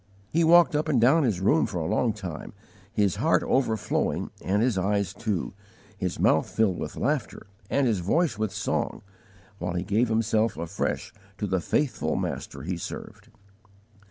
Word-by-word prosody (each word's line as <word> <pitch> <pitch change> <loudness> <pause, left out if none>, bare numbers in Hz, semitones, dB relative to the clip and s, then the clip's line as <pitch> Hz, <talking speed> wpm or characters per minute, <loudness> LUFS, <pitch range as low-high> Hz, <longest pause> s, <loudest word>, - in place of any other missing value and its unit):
He 165 +2 +3
walked 170 -1 +6
up 155 +1 0
and 135 -5 +3
down 135 +8 +5
his 110 -10 +1
room 80 -6 +3
for - - -5
a 80 - -2
long 115 +8 +1
time, 95 -7 -7 0.4
his 100 -3 +1
heart - - +2
overflowing 115 -5 0
and 100 +4 +1
his 125 -3 +2
eyes 100 0 0
too, 105 -6 -2 0.4
his 95 -3 -3
mouth - - +3
filled 105 -5 +1
with - - -5
laughter - - -2 0.2
and 140 +2 +2
his 110 -6 +1
voice 145 - +1
with 110 -1 -2
song, 105 +2 -2 0.6
while 90 0 -2
he 90 0 -1
gave 105 +6 +2
himself 110 -2 +1
afresh 85 0 -3 0.2
to 105 - -2
the 95 -2 0
faithful 145 - 0
Master 70 -1 -4
he 90 +2 -3
served. - - -8
105 Hz, 165 wpm, -26 LUFS, 95-120 Hz, 0.6 s, walked